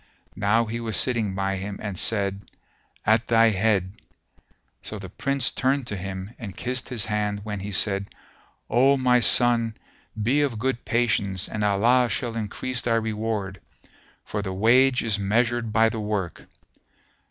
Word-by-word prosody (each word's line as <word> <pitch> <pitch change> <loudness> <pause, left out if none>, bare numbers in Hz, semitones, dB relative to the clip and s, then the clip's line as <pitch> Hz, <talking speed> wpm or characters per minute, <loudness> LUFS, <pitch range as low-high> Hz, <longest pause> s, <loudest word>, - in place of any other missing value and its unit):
Now 110 +3 +3
he 115 +1 -4
was 115 -3 -2
sitting 115 -6 0
by 95 0 -1
him 100 +1 -5
and 105 -3 -5
said, 100 -1 +1 0.6
"At 110 +2 +3
thy 115 -1 +5
head." 100 -2 +1 0.9
So 110 - -6
the 95 -2 -8
Prince 140 +3 0
turned 135 0 0
to 105 - -5
him 95 +2 -6
and 100 -6 -8
kissed 125 0 -2
his 120 -4 0
hand 105 -1 -2
when 105 -2 -4
he 100 +2 -6
said, 100 0 +1 0.6
"O 135 +4 +4
my 125 -1 +3
son! 115 -2 +3 0.4
Be 125 +8 +2
of 135 -6 -1
good 125 +1 -2
patience 100 -6 0
and 105 - -4
Allah 115 +5 +3
shall 120 -1 -3
increase 115 +3 -2
thy 115 -1 +1
reward; 110 -4 -3 0.6
for 105 - -3
the 95 -2 -4
wage 125 +6 +4
is 110 -3 0
measured 115 +3 0
by 115 +1 +4
the 110 0 -3
work." 105 -5 -4
110 Hz, 155 wpm, -24 LUFS, 100-120 Hz, 0.9 s, thy